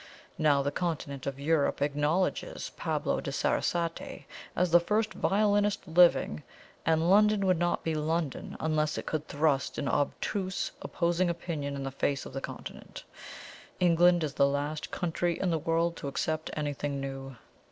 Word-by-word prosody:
Now 145 -3 +4
the 140 - 0
Continent 145 -5 -3
of 140 0 -3
Europe 150 0 +1
acknowledges 150 - 0
Pablo - - -1
de - - -4
Sarasate 170 -1 -1 0.3
as 180 -1 +1
the 175 - +8
first 215 +5 0
violinist 205 0 +1
living, 165 - +4 0.5
and 160 0 +3
London 210 +1 +5
would 185 -3 +3
not 175 0 0
be 165 - -1
London 155 -1 -2
unless 155 -1 0
it - - -4
could 155 -1 -3
thrust 145 -2 0
an 140 - -2
obtuse 185 +7 -1
opposing 175 +1 0
opinion 160 -4 -3
in 135 - -4
the 135 - -3
face 135 0 -1
of - - -9
the 135 - -4
Continent. - - -8 0.8
England 175 -1 +4
is 145 -3 -2
the 140 - +4
last 145 +2 -2
country 175 0 -1
in 185 - +1
the 165 - +1
world 165 +2 +1
to - - -5
accept 155 +3 -2
anything 145 -1 -2
new. 135 -1 -6
160 Hz, 155 wpm, -29 LUFS, 145-175 Hz, 0.8 s, the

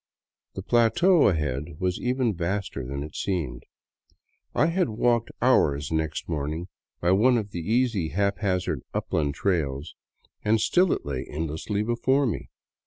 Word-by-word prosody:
The 95 - -5
plateau 125 - +4
ahead 75 -4 -1
was 90 -1 -1
even 125 -2 +1
vaster 90 -4 -3
than 70 +3 -4
it 75 - -9
seemed. 90 -6 -3 0.9
I - - +4
had 170 +1 +1
walked 115 +1 +1
hours 75 - +3
next 80 -1 -2
morning 80 +3 -3 0.3
by 85 - +2
one 120 +6 +4
of 105 -3 -3
those - - -6
easy 110 -3 +1
haphazard 95 - 0
upland 70 -2 -1
trails, 75 -6 -1 0.5
and 110 +1 +3
still 180 - +3
it - - -1
lay 70 -3 -4
endless 80 0 -4
before 120 +6 +1
me. 115 - -3
95 Hz, 140 wpm, -26 LUFS, 75-120 Hz, 0.9 s, plateau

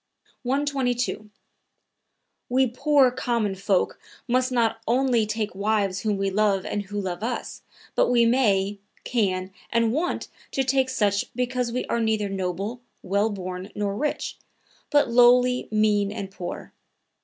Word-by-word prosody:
122. 255 -4 -1 1.2
"We 260 +2 +3
poor, 270 +1 +3
common 235 -5 -1
folk 190 0 0 0.3
must 255 +1 +1
not 225 -2 +1
only 245 -2 +2
take 215 0 -2
wives 200 -1 0
whom 210 -3 -1
we 195 0 0
love 200 -1 +2
and 205 - -2
who 205 +1 -4
love 185 -2 -4
us, 235 +2 -4 0.3
but - - +2
we 240 -1 +4
may, 205 -5 +2 0.2
can 190 -5 0 0.2
and 230 -1 +2
want 330 +6 -1 0.3
to 270 - +1
take 260 0 +2
such 205 -6 +1
because 250 -1 -1
we 250 +2 -2
are 235 - -1
neither 220 -2 0
noble, 195 +5 -3 0.2
well 200 +4 +1
born 185 -1 -5
nor 205 -1 -1
rich, 295 +7 -2 0.5
but 290 -5 +3
lowly, 250 +1 +5
mean 210 -2 +2
and 200 -2 -6
poor. 180 -2 -7
220 Hz, 140 wpm, -25 LUFS, 200-250 Hz, 1.2 s, lowly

